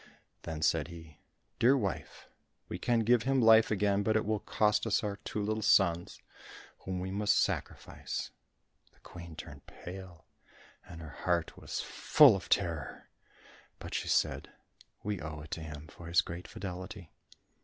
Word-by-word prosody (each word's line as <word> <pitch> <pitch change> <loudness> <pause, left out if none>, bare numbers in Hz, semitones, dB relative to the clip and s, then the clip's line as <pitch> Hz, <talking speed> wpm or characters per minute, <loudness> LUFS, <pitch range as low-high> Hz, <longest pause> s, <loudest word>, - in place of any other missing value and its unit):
Then 80 -1 -5
said 80 -2 +2
he, 80 -3 -12 0.4
"Dear 130 +4 +5
wife, 100 -8 -4 0.4
we 90 - -5
can 120 +3 +2
give 120 +1 +4
him 135 +3 0
his 125 - +3
life 110 0 +7
again, 100 -1 +2
but 110 +1 +1
it 110 - -1
will 110 0 0
cost 105 +1 +1
us 115 +2 +1
our 100 -1 -2
two 105 - -5
little 110 +1 -1
sons, 85 -4 +3 0.6
whom 95 -1 -4
we 95 +1 -4
must 100 +1 +2
sacrifice." - - -2 0.6
The - - -28
Queen 85 -2 -10
turned - - -10
pale, 90 -3 -10 0.6
and 85 -1 -10
her 80 -2 -9 0.2
heart 85 -2 +1
was - - -5
full 145 -8 +6
of 95 - -6
terror, 85 -7 -1 0.7
but - - -9
she - - -2
said, 70 0 +1 0.5
"We 105 -2 -3
owe 75 -1 -6
it 80 - -12
to 80 - -4
him, 75 -1 -8
for 85 +2 -12
his 85 +2 +4
great 85 0 -8
fidelity." 95 -1 -7
95 Hz, 165 wpm, -31 LUFS, 85-105 Hz, 0.7 s, life